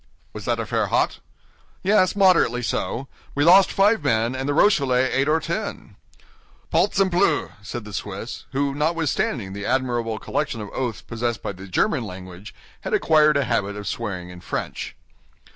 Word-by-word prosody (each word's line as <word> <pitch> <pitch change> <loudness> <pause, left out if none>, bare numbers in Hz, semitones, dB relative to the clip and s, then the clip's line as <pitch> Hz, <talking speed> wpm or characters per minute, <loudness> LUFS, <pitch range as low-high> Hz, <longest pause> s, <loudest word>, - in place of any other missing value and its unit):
"Was - - -8
that - - 0
affair - - 0
hot?" - - +1 0.6
"Yes, 190 -1 +3
moderately 180 - +4
so. 130 +2 -2 0.3
We 145 - +2
lost 185 +4 +7
five 205 -2 +3
men, 115 -3 +1
and 135 +2 -3
the - - +2
Rochellais 135 -9 +3
eight 135 +2 +1
or 155 +1 +3
ten." 170 +6 -5 0.8
"Balzempleu!" 185 -5 +2
said 110 +1 -6
the 105 - -9
Swiss, 100 +3 -6
who, 140 +1 0
notwithstanding 155 - -1
the 100 0 -5
admirable 120 -3 0
collection 115 - -2
of 105 -1 -7
oaths 125 -4 -3
possessed 120 0 -3
by - - -2
the 95 0 -10
German 95 +6 +1
language, 95 0 -9 0.2
had - - -1
acquired 155 -2 +4
a 140 - +2
habit 100 -5 -1
of 105 0 -7
swearing 90 -7 -4
in 90 0 -11
French. - - -4
130 Hz, 160 wpm, -23 LUFS, 105-160 Hz, 0.8 s, lost